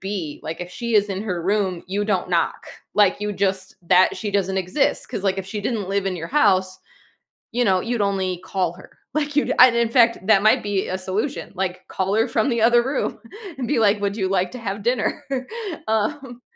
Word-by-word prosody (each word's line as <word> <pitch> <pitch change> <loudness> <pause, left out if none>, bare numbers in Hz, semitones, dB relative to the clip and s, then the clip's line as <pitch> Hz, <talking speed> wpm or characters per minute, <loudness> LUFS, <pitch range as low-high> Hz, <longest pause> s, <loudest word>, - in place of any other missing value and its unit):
be 190 -6 -4
like, 160 +2 -5
if 180 0 -6
she 235 +5 -4
is 205 -1 +4
in 195 0 -3
her 180 -6 -3
room, 190 -2 0
you 205 +2 -1
don't 190 -4 -1
knock, 170 -1 0 0.3
like, 205 -1 +3
you 210 0 -2
just 190 -1 -2
that 180 +2 +4
she 210 - -4
doesn't 190 -1 0
exist. 270 +11 0
'Cause, 205 -5 -5
like, 195 0 +1
if 190 - -5
she 210 0 -4
didn't 210 -3 -2
live 195 0 0
in 190 - -1
your 165 -1 -6
house, 190 -8 +2 0.7
you 245 +1 +1
know, 185 -1 +3
you'd 235 -2 -2
only 185 -2 -2
call 185 -3 -1
her. 185 - -16 0.2
Like, 295 -1 -1
you'd 295 - +2
and 250 -1 +8
in 235 -1 +2
fact, 230 -1 +4
that 195 -3 +5
might 215 - +5
be 200 -2 -1
a 185 - -2
solution, 205 +10 -3
like, 185 -1 -3
call 190 +1 -2
her 225 +3 +2
from 230 +4 +1
the 235 -2 0
other 240 +1 +5
room, 265 +4 -2 0.4
and 250 -3 -3
be, 260 -4 +1
like, 210 -1 +3
"Would 200 0 -1
you 190 -2 0
like 185 -1 0
to 250 - -8
have 200 -2 -4
dinner?" 240 -1 0 0.6
Um 240 +3 -2
200 Hz, 220 wpm, -22 LUFS, 185-230 Hz, 0.7 s, and